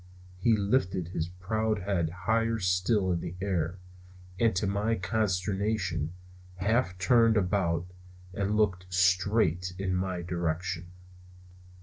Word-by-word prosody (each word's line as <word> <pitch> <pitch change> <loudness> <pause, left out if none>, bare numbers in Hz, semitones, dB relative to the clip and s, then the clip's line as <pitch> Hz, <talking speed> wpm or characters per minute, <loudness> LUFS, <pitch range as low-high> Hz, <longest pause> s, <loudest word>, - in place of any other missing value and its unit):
He 110 +3 +3
lifted 100 -5 0
his 80 -2 -2
proud 105 +3 -2
head 90 -5 0 0.2
higher 115 +1 +2
still 95 +1 +1
in 85 - 0
the 85 +1 -6
air, 90 -3 -1 0.6
and 115 -4 +3
to 90 - +1
my 100 +3 +1
consternation 95 -4 -1 0.4
half 100 0 0
turned 115 +4 +4
about 90 -4 +1 0.5
and 100 +2 0
looked 90 -4 0
straight 90 -1 +2
in 95 -1 -1
my 90 -1 -2
direction. 85 0 -2
95 Hz, 115 wpm, -29 LUFS, 90-105 Hz, 0.6 s, turned